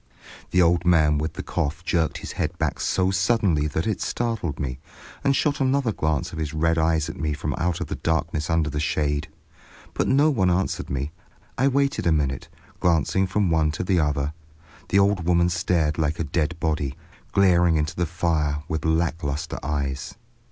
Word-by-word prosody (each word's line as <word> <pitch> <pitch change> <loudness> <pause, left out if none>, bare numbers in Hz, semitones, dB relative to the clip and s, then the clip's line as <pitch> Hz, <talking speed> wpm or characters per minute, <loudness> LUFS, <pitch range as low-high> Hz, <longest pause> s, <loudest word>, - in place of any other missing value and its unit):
The 90 -1 +4
old 85 0 +3
man 80 -4 +4
with 75 +1 -2
the - - -6
cough 80 +4 -2
jerked 85 -3 +1
his - - -7
head - - -3
back - - -1
so 95 0 +1
suddenly 95 -5 +2
that 80 +4 -2
it 110 -3 -1
startled 115 -11 -2
me, 65 -2 -3 0.4
and 140 -1 +3
shot 145 0 +1
another 130 -2 +2
glance 80 -1 -1
of 80 - -5
his 80 0 -3
red 80 +1 +2
eyes 80 -1 +2
at 80 - -7
me 75 -1 -1
from - - -3
out 85 0 0
of - - -2
the - - -5
darkness 80 -1 -1
under 80 -1 +2
the 75 -1 -3
shade, 75 -2 0 0.7
but - - 0
no 145 +4 +4
one 95 -9 +2
answered 90 +2 -1
me. 70 +2 -2 0.4
I 130 - +2
waited 140 - +1
a - - +4
minute, 70 -4 0 0.3
glancing 90 +3 +2
from 95 -1 +1
one 80 -1 +3
to - - -3
the 90 -1 +2
other. 75 -1 0 0.6
The 95 - +3
old 100 -2 +3
woman 85 0 +3
stared 85 -3 0
like 80 0 0
a - - +1
dead 80 +2 -1
body, 75 -4 -1 0.4
glaring 90 -4 +4
into 75 +2 -1
the 90 -1 0
fire 75 -3 0
with 80 -1 -3
lack 80 +1 +1
lustre 75 +3 -3
eyes. 70 -1 -3
80 Hz, 190 wpm, -24 LUFS, 75-90 Hz, 0.7 s, The